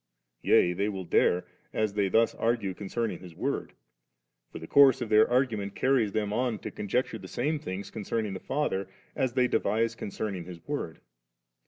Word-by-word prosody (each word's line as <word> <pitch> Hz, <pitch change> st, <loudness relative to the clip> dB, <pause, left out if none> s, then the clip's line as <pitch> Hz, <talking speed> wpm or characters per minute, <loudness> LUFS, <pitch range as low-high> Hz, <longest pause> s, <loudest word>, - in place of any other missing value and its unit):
Yea, 90 Hz, -, +4 dB
they 100 Hz, +4 st, 0 dB
will 95 Hz, -2 st, -4 dB
dare, 90 Hz, +1 st, +2 dB, 0.3 s
as 110 Hz, -2 st, 0 dB
they 100 Hz, -2 st, +1 dB
thus 115 Hz, +4 st, +3 dB
argue 115 Hz, -4 st, 0 dB
concerning 105 Hz, +4 st, -3 dB
His 90 Hz, -3 st, -12 dB
Word; -, -, -3 dB, 0.8 s
for -, -, -7 dB
the -, -, -8 dB
course 140 Hz, -2 st, +6 dB
of 120 Hz, -3 st, -4 dB
their 110 Hz, 0 st, +5 dB
argument 115 Hz, -6 st, 0 dB
carries 130 Hz, -6 st, +2 dB
them 105 Hz, -1 st, -1 dB
on 120 Hz, -1 st, 0 dB
to -, -, -7 dB
conjecture 120 Hz, +5 st, -2 dB
the -, -, -9 dB
same 150 Hz, +5 st, -1 dB
things 100 Hz, -9 st, -6 dB
concerning 110 Hz, -1 st, -2 dB
the 95 Hz, -, -5 dB
Father, 115 Hz, -9 st, -1 dB, 0.3 s
as 130 Hz, -2 st, 0 dB
they 125 Hz, -1 st, +3 dB
devise 115 Hz, +1 st, +1 dB
concerning 100 Hz, -4 st, -4 dB
His 90 Hz, -1 st, -9 dB
Word. -, -, -4 dB
110 Hz, 175 wpm, -28 LUFS, 100-120 Hz, 0.8 s, course